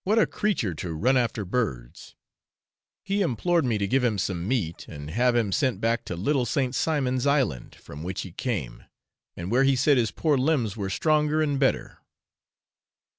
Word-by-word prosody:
What 210 +4 +1
a 225 - +5
creature 185 - -1
to 80 +2 -5
ran 125 +12 +2
after 115 -4 0
birds! 90 - -4 0.9
He 200 +1 -1
implored 170 - +1
me 115 -4 +1
to 100 - -1
give 130 +6 +1
him 115 -4 +1
some 90 -2 -2
meat, 100 -10 -2
and 75 -1 -8
have 120 +4 +2
him 115 -4 +1
sent 130 +1 0
back 115 +1 0
to 90 - -4
Little 125 - 0
St. 130 -3 0
Simon's 135 -4 0
Island, 135 - 0
from 75 - -11
which 90 +3 -4
he 95 - -8
came, 85 - -4 0.5
and 85 +4 -5
where 130 +3 +4
he 135 0 +4
said 140 +2 +3
his 115 -2 +1
poor 145 +6 +1
limbs 130 -7 +1
were 100 -3 -3
stronger 155 +6 +1
and 145 -3 0
better. 135 -2 0
125 Hz, 180 wpm, -26 LUFS, 95-140 Hz, 0.9 s, a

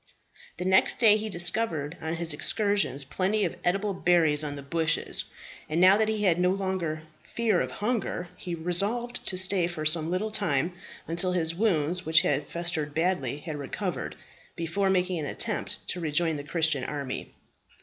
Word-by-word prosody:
The 180 - -4
next 190 0 +5
day 220 -3 +6
he 215 0 -3
discovered 175 -4 +2
on 160 +1 -3
his 165 -2 +1
excursions 200 - +1
plenty 195 +8 0
of - - -3
eatable 195 +3 0
berries 165 -5 +3
on 145 -1 -4
the 140 - -8
bushes; 160 +3 0 0.4
and 155 +2 0
now 185 +2 +7
that 220 0 +1
he 215 -1 -1
had 175 -3 +3
no 180 0 +3
longer 185 -5 -2 0.2
fear 225 -6 0
of - - -2
hunger 210 -5 -3
he 175 -1 -6
resolved 200 +9 -2
to 185 - +1
stay 185 -1 +3
for 160 -3 -5
some 155 +1 +3
little 195 +5 -2
time, 170 -6 0 0.3
until 175 +2 0
his 165 -2 0
wounds, 180 -3 0
which 160 -1 +5
had 145 0 -1
festered 160 -4 -2
badly, 160 -6 0
had 155 -2 -6
recovered, 140 - -4 0.4
before 180 +4 -1
making 185 -2 0
an 150 - -4
attempt 215 +6 -3
to 180 - -2
rejoin 160 0 0
the 145 - -6
Christian 155 -3 +1
army. 140 -2 -5
175 Hz, 170 wpm, -27 LUFS, 155-195 Hz, 0.4 s, now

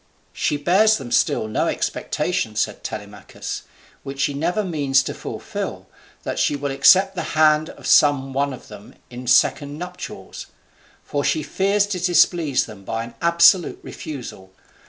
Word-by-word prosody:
"She 145 - -1
bears 195 +9 +3
them 130 -5 -8
still - - +2
in 110 0 -8
expectation," - - -1
said - - -2
Telemachus, 105 -2 -7 0.4
"which 135 0 -8
she 145 - +1
never 175 +9 -1
means 140 -7 +1
to - - -4
fulfil, - - -6 0.4
that - - -3
she - - +2
will 140 0 -3
accept 190 +8 +5
the - - -3 0.2
hand 155 0 +4
of - - -13
some 135 -2 +4
one 140 +1 0
of 130 - -10
them 105 -1 -13 0.2
in 125 +1 -8
second 145 +3 +2
nuptials. 180 +2 -8 0.6
For 145 -1 -2
she 155 +2 0
fears 200 +1 +1
to 205 -3 -4
displease 170 -4 +2
them 105 -3 -12
by 115 +3 -3
an 115 - -10
absolute 170 +1 +4
refusal. 125 -10 -8
145 Hz, 155 wpm, -21 LUFS, 130-175 Hz, 0.6 s, accept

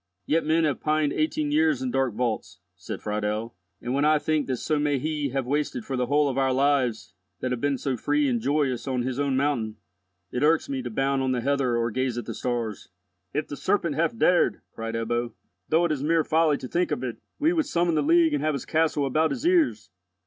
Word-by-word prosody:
"Yet 165 +2 +1
men 160 +2 +2
have 150 -4 0
pined 155 -1 +1
eighteen 310 -1 0
years 310 -2 +3
in 260 -1 -2
dark 130 - 0
vaults," 120 -1 -2 0.2
said - - -7
Friedel; 105 +2 -2 0.2
"and, 125 - -4
when 140 +1 +1
I 155 +1 +5
think 150 0 0
that 130 - 0
so 155 +4 -1
may 145 -1 +1
he 150 0 -2
have 135 0 -2
wasted 140 -3 -2
for 135 - -3
the 125 -1 0
whole 145 +2 +3
of 135 -1 -1
our 135 -1 +2
lives 130 -7 +1 0.3
that 130 - -2
have 125 -2 -2
been 140 -1 +1
so 135 0 -2
free 145 +4 +1
and 120 -3 0
joyous 140 -1 0
on 130 -2 0
his 130 +1 -3
own 140 -2 +1
mountain, 125 -6 0 0.6
it 125 - -2
irks 155 +2 +3
me 135 -1 -3
to 125 - -5
bound 135 +4 0
on 130 -1 +1
the 125 - -1
heather 135 -2 +1
or 115 0 0
gaze 130 0 -1
at 120 - -4
the 115 - -5
stars." 115 -2 -3 0.4
"If 150 +2 -2
the 145 - -6
serpent 170 -1 0
hath 170 +10 0
dared," 180 -5 +3
cried 115 0 -5
Ebbo, 120 0 -2 0.4
"though 165 +2 +3
it 170 - 0
is 145 -3 -1
mere 160 +2 +2
folly 155 -1 +2
to 130 - -7
think 175 +6 0
of 125 - -2
it, 125 -3 -4 0.2
we 320 +4 +2
would 320 -4 0
summon 170 - +1
the 155 - +2
League 165 +1 +4
and 145 - 0
have 155 -1 +1
his 140 - -5
castle 155 -3 +1
about 155 +4 +2
his 140 - -4
ears! 340 - +2
140 Hz, 235 wpm, -26 LUFS, 125-155 Hz, 0.6 s, I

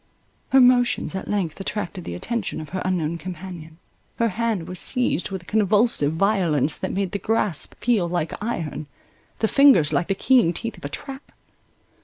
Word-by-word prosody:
Her 270 - +5
motions 245 -4 +3
at 190 - -5
length 195 -5 -2
attracted 195 -2 -4
the 85 - -5
attention 215 - -3
of 155 -2 -8
her 185 +3 -4
unknown 170 -3 -1
companion; 170 -2 -8 0.4
her 230 -1 +1
hand 215 -4 -2
was 180 -1 -3
seized 250 -8 0
with 190 -3 -6
a - - -22
convulsive 210 -7 +2
violence 165 -6 +1
that - - -4
made 195 -2 -2
the 200 - -3
grasp 210 -8 +1
feel 210 -7 +1
like 170 -2 -2
iron, 160 -9 -4 0.5
the 220 - +1
fingers 265 - +5
like 175 - +1
the 195 - 0
keen 235 -5 +3
teeth 230 +6 -4
of - - -11
a - - -3
trap. 270 - -7
190 Hz, 175 wpm, -23 LUFS, 165-225 Hz, 0.5 s, Her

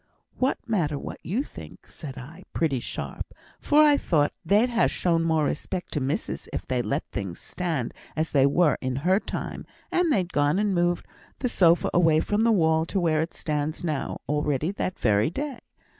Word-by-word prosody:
'What 260 +1 +1
matter 165 -10 0
what - - -7
you 225 +10 -1
think!' - - -12
said 140 -4 -9
I, 135 +6 -10
pretty 150 -6 +1
sharp, - - -6 0.2
for 300 +1 +5
I 295 -1 +6
thought 150 - +1
they'd 210 +8 +3
ha' 235 - +3
shown 165 -2 +1
more 160 -2 +2
respect 180 +5 -3
to 150 - 0
missus 140 +9 -3
if - - -4
they'd 125 -2 -1
let 140 +2 0
things 95 -4 -4
stand 160 -10 -3 0.2
as 160 +1 -1
they 140 -1 +5
were 150 +1 +3
in 130 -1 -2
her 190 +2 +4
time; - - -5 0.3
and 355 -2 +2
they'd 185 -8 0
gone 145 +3 +2
and 205 -1 +1
moved 175 0 +1 0.3
the 250 - -1
sofa 175 -5 +4
away 165 -3 +4
from 210 +6 +1
the 230 - +4
wall 160 -5 +3
to 195 - -1
where 160 -3 +2
it 165 - -4
stands 150 +1 -2
now, 155 -5 -2
already 150 +2 0
that 185 -2 -3
very 105 0 +2
day. 275 - -4
165 Hz, 190 wpm, -26 LUFS, 145-195 Hz, 0.3 s, I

